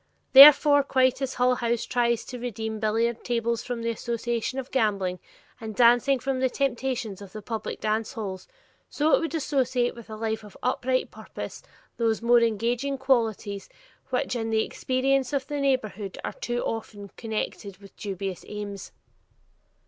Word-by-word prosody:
Therefore 285 Hz, +1 st, +10 dB
quite 260 Hz, -1 st, +2 dB
as 265 Hz, -1 st, -2 dB
Hull 250 Hz, 0 st, +3 dB
House 235 Hz, -1 st, -1 dB
tries 235 Hz, -2 st, 0 dB
to 250 Hz, -, -7 dB
redeem 220 Hz, -2 st, -4 dB
billiard 225 Hz, +2 st, 0 dB
tables 235 Hz, -1 st, -1 dB
from 240 Hz, -2 st, -5 dB
the 230 Hz, -, 0 dB
association 235 Hz, +2 st, -3 dB
of 265 Hz, -1 st, -5 dB
gambling, 200 Hz, -7 st, 0 dB, 0.4 s
and 220 Hz, -2 st, -7 dB
dancing 245 Hz, +3 st, +5 dB
from 260 Hz, +1 st, -2 dB
the 260 Hz, 0 st, +2 dB
temptations 250 Hz, -6 st, -2 dB
of 195 Hz, -2 st, -11 dB
the 215 Hz, -, -7 dB
public 225 Hz, 0 st, -5 dB
dance 215 Hz, +2 st, -1 dB
halls, 200 Hz, -6 st, -6 dB, 0.4 s
so 305 Hz, +2 st, +1 dB
it -, -, +6 dB
would 330 Hz, 0 st, -3 dB
associate 260 Hz, -5 st, 0 dB
with 235 Hz, -1 st, -13 dB
a 215 Hz, -, -6 dB
life 220 Hz, 0 st, -3 dB
of 205 Hz, -2 st, -13 dB
upright 255 Hz, +1 st, 0 dB
purpose -, -, -8 dB, 0.4 s
those 225 Hz, -2 st, +1 dB
more 240 Hz, +1 st, +5 dB
engaging 235 Hz, +5 st, 0 dB
qualities 225 Hz, -7 st, 0 dB, 0.4 s
which 255 Hz, 0 st, -1 dB
in 225 Hz, -1 st, -2 dB
the 220 Hz, 0 st, +2 dB
experience 265 Hz, 0 st, 0 dB
of 275 Hz, -2 st, 0 dB
the 290 Hz, +1 st, -4 dB
neighborhood 215 Hz, -8 st, -1 dB
are -, -, -4 dB
too 240 Hz, 0 st, -3 dB
often 205 Hz, -3 st, -5 dB
connected 215 Hz, -2 st, -5 dB
with 200 Hz, 0 st, -16 dB
dubious 195 Hz, -2 st, -5 dB
aims. 205 Hz, -2 st, -7 dB
235 Hz, 160 wpm, -26 LUFS, 215-255 Hz, 0.4 s, Therefore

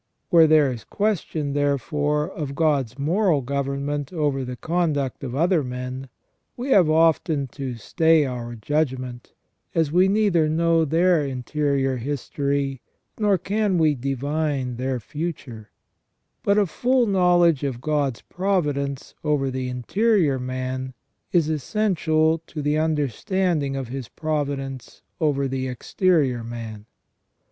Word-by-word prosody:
Where 165 Hz, -3 st, +7 dB
there 150 Hz, -3 st, +5 dB
is 115 Hz, -3 st, -7 dB
question, 160 Hz, -, -1 dB
therefore, 145 Hz, +2 st, 0 dB
of 150 Hz, -7 st, -5 dB
God's 140 Hz, -7 st, +1 dB
moral 165 Hz, +1 st, +2 dB
government 140 Hz, +2 st, -2 dB
over 145 Hz, -6 st, 0 dB
the 125 Hz, 0 st, -5 dB
conduct 155 Hz, -4 st, -1 dB
of 130 Hz, -2 st, -4 dB
other 170 Hz, +1 st, +2 dB
men, 125 Hz, +1 st, -5 dB, 0.5 s
we 255 Hz, +3 st, -3 dB
have 185 Hz, -9 st, +5 dB
often 160 Hz, -2 st, +3 dB
to 130 Hz, -1 st, -5 dB
stay 160 Hz, -, +3 dB
our 120 Hz, -2 st, -5 dB
judg 140 Hz, +4 st, 0 dB
ment, 125 Hz, -1 st, -9 dB, 0.4 s
as 160 Hz, -3 st, +2 dB
we 180 Hz, +3 st, +4 dB
neither 195 Hz, -6 st, +2 dB
know 165 Hz, +1 st, +2 dB
their 165 Hz, +1 st, +3 dB
interior 135 Hz, 0 st, -1 dB
history 140 Hz, +1 st, -2 dB, 0.4 s
nor 205 Hz, -3 st, +3 dB
can 200 Hz, +1 st, 0 dB
we 155 Hz, -2 st, +4 dB
divine 140 Hz, 0 st, -2 dB
their 130 Hz, 0 st, -2 dB
future; 135 Hz, -5 st, -6 dB, 0.7 s
but 200 Hz, +1 st, +2 dB
a 210 Hz, -, +4 dB
full 250 Hz, +8 st, +1 dB
knowledge 175 Hz, -, +3 dB
of 135 Hz, -4 st, -2 dB
God's 140 Hz, -3 st, -1 dB
providence 145 Hz, -8 st, -1 dB
over 145 Hz, -3 st, +1 dB
the 130 Hz, 0 st, -3 dB
interior 155 Hz, -, +1 dB
man 130 Hz, 0 st, -4 dB, 0.4 s
is 170 Hz, -4 st, +3 dB
essential 160 Hz, -, +1 dB
to 150 Hz, -3 st, -6 dB
the 150 Hz, +1 st, +1 dB
understanding 155 Hz, -, 0 dB
of 135 Hz, -3 st, -4 dB
His 130 Hz, -2 st, -5 dB
providence 140 Hz, -4 st, -4 dB, 0.2 s
over 140 Hz, -3 st, +1 dB
the 130 Hz, 0 st, -2 dB
exterior 130 Hz, -1 st, +1 dB
man. 115 Hz, -2 st, -7 dB
145 Hz, 130 wpm, -23 LUFS, 130-165 Hz, 0.7 s, Where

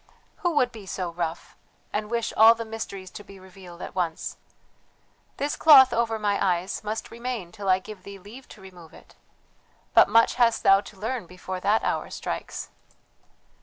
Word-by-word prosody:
"Who 350 Hz, -5 st, -1 dB
would 250 Hz, -4 st, +2 dB
be 215 Hz, -4 st, -12 dB
so 180 Hz, -1 st, -4 dB
rough! 170 Hz, -1 st, -5 dB, 0.4 s
And 210 Hz, 0 st, -2 dB
wish 235 Hz, -1 st, -2 dB
all 225 Hz, +2 st, +8 dB
the 230 Hz, 0 st, -6 dB
mysteries 200 Hz, -4 st, -7 dB
to 205 Hz, -, -10 dB
be 195 Hz, -1 st, -14 dB
revealed 185 Hz, -2 st, -12 dB
at -, -, -8 dB
once? 170 Hz, -3 st, -3 dB, 1.0 s
This 285 Hz, +1 st, -2 dB
cloth 265 Hz, -5 st, +7 dB
over 230 Hz, -1 st, 0 dB
my 205 Hz, -2 st, 0 dB
eyes 185 Hz, +1 st, -1 dB
must 215 Hz, +1 st, -5 dB
remain 235 Hz, -6 st, -5 dB
till 200 Hz, 0 st, -5 dB
I 185 Hz, -, +5 dB
give 200 Hz, 0 st, -11 dB
thee 200 Hz, +1 st, -10 dB
leave 215 Hz, +8 st, -13 dB
to 210 Hz, -, -14 dB
remove 180 Hz, -4 st, -14 dB
it. -, -, -18 dB, 0.8 s
But -, -, +6 dB
much 230 Hz, 0 st, +4 dB
hast 230 Hz, -1 st, +3 dB
thou 195 Hz, 0 st, +6 dB
to 200 Hz, -1 st, -14 dB
learn 225 Hz, -2 st, -4 dB
before 185 Hz, +1 st, -7 dB
that 210 Hz, +4 st, +1 dB
hour -, -, -2 dB
strikes. -, -, -6 dB
205 Hz, 175 wpm, -25 LUFS, 185-230 Hz, 1.0 s, all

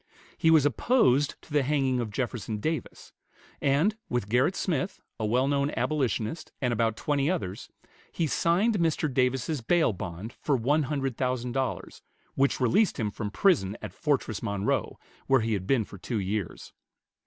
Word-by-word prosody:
He 160 Hz, -, +2 dB
was 160 Hz, -3 st, +6 dB
opposed 145 Hz, -, +2 dB
to 150 Hz, -, -13 dB
the 145 Hz, -, +4 dB
hanging 135 Hz, -2 st, +1 dB
of 115 Hz, -2 st, -2 dB
Jefferson 115 Hz, -1 st, -3 dB
Davis; 155 Hz, +9 st, -4 dB, 0.5 s
and 145 Hz, +10 st, +2 dB
with 120 Hz, -5 st, -1 dB
Gerritt 125 Hz, -, +2 dB
Smith, 175 Hz, -1 st, -2 dB, 0.2 s
a 110 Hz, -, 0 dB
well 125 Hz, +5 st, +2 dB
known 140 Hz, 0 st, +1 dB
abolitionist, 140 Hz, 0 st, -1 dB
and 125 Hz, -3 st, 0 dB
about 115 Hz, -1 st, 0 dB
twenty 145 Hz, 0 st, 0 dB
others, 105 Hz, -, -3 dB, 0.4 s
he 165 Hz, -, -1 dB
signed 180 Hz, +8 st, +2 dB
Mr. 160 Hz, -3 st, 0 dB
Davis's 130 Hz, +3 st, 0 dB
bail 160 Hz, 0 st, +2 dB
bond 95 Hz, +4 st, -6 dB
for 145 Hz, -, +2 dB
one 145 Hz, +7 st, +2 dB
hundred 135 Hz, -5 st, -2 dB
thousand 125 Hz, -1 st, -1 dB
dollars, 130 Hz, +1 st, -3 dB, 0.3 s
which 135 Hz, +1 st, +1 dB
released 160 Hz, -, +2 dB
him 105 Hz, -2 st, -1 dB
from 105 Hz, 0 st, -4 dB
prison 105 Hz, -, +2 dB
at -, -, -7 dB
Fortress 140 Hz, -, -1 dB
Monroe, 100 Hz, -3 st, -1 dB, 0.3 s
where 135 Hz, -3 st, +4 dB
he 110 Hz, 0 st, 0 dB
had 95 Hz, -2 st, -3 dB
been 125 Hz, -6 st, +2 dB
for 100 Hz, -, -12 dB
two 115 Hz, +5 st, -3 dB
years. 100 Hz, -1 st, -4 dB
130 Hz, 165 wpm, -28 LUFS, 110-150 Hz, 0.5 s, was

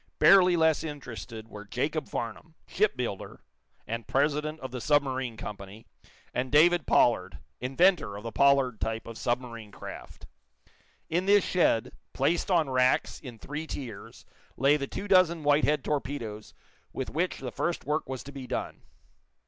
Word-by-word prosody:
Barely 180 Hz, -3 st, +6 dB
less 160 Hz, -1 st, +3 dB
interested 120 Hz, -7 st, -7 dB
were 105 Hz, -2 st, -9 dB
Jacob 140 Hz, +8 st, -2 dB
Farnum, 120 Hz, +8 st, -5 dB
shipbuilder, 125 Hz, -, -2 dB, 0.5 s
and 115 Hz, 0 st, -5 dB
president 150 Hz, +2 st, 0 dB
of 130 Hz, -, -6 dB
the 125 Hz, -1 st, -5 dB
submarine 130 Hz, -4 st, +1 dB
company, 100 Hz, +1 st, -8 dB, 0.5 s
and 125 Hz, +1 st, -2 dB
David 165 Hz, +1 st, +5 dB
Pollard, 95 Hz, -6 st, +3 dB, 0.2 s
inventor 135 Hz, -, +2 dB
of 105 Hz, -, -9 dB
the 115 Hz, -, -5 dB
Pollard 135 Hz, -4 st, +3 dB
type 110 Hz, 0 st, -2 dB
of 115 Hz, -, -8 dB
submarine 115 Hz, -3 st, -3 dB
craft. -, -, -10 dB, 0.8 s
In 175 Hz, +4 st, -1 dB
this 205 Hz, 0 st, +6 dB
shed, 170 Hz, -11 st, +2 dB, 0.2 s
placed 175 Hz, +4 st, 0 dB
on 170 Hz, -5 st, +3 dB
racks 130 Hz, -1 st, +1 dB
in 125 Hz, -5 st, -10 dB
three 150 Hz, +7 st, -6 dB
tiers, 120 Hz, -10 st, -8 dB, 0.3 s
lay 140 Hz, +3 st, +4 dB
the 140 Hz, -2 st, -2 dB
two 205 Hz, -, -6 dB
dozen 180 Hz, -4 st, +4 dB
Whitehead 150 Hz, 0 st, +3 dB
torpedoes 130 Hz, -7 st, -4 dB, 0.4 s
with 130 Hz, -, -5 dB
which 175 Hz, +4 st, -1 dB
the 125 Hz, -2 st, -6 dB
first 170 Hz, +7 st, -2 dB
work 150 Hz, 0 st, -1 dB
was 130 Hz, -1 st, -5 dB
to 140 Hz, -, -10 dB
be 135 Hz, -2 st, -8 dB
done. -, -, -4 dB
135 Hz, 150 wpm, -28 LUFS, 115-155 Hz, 0.8 s, Barely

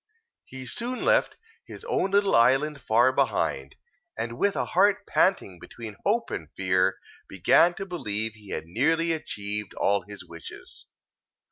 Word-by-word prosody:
He 130 Hz, -1 st, -9 dB
soon 240 Hz, -, -3 dB
left -, -, +2 dB, 0.3 s
his -, -, -11 dB
own 460 Hz, -, 0 dB
little 200 Hz, 0 st, +3 dB
island 135 Hz, +5 st, +3 dB
far 120 Hz, +4 st, +3 dB
behind, 105 Hz, -, -1 dB, 0.4 s
and 115 Hz, +1 st, -4 dB
with 200 Hz, 0 st, +2 dB
a -, -, -1 dB
heart 200 Hz, +2 st, +2 dB
panting 100 Hz, -, +1 dB
between 110 Hz, +1 st, -9 dB
hope 225 Hz, +4 st, 0 dB
and 80 Hz, -2 st, -5 dB
fear, 95 Hz, 0 st, +1 dB, 0.3 s
began 95 Hz, -, +4 dB
to 195 Hz, -, -5 dB
believe 110 Hz, -, -3 dB
he 105 Hz, -2 st, -16 dB
had -, -, -4 dB
nearly 160 Hz, -, +1 dB
achieved 105 Hz, -9 st, -4 dB
all 100 Hz, 0 st, +1 dB
his 100 Hz, +2 st, -11 dB
wishes. 85 Hz, -1 st, -12 dB
120 Hz, 145 wpm, -26 LUFS, -, 0.4 s, began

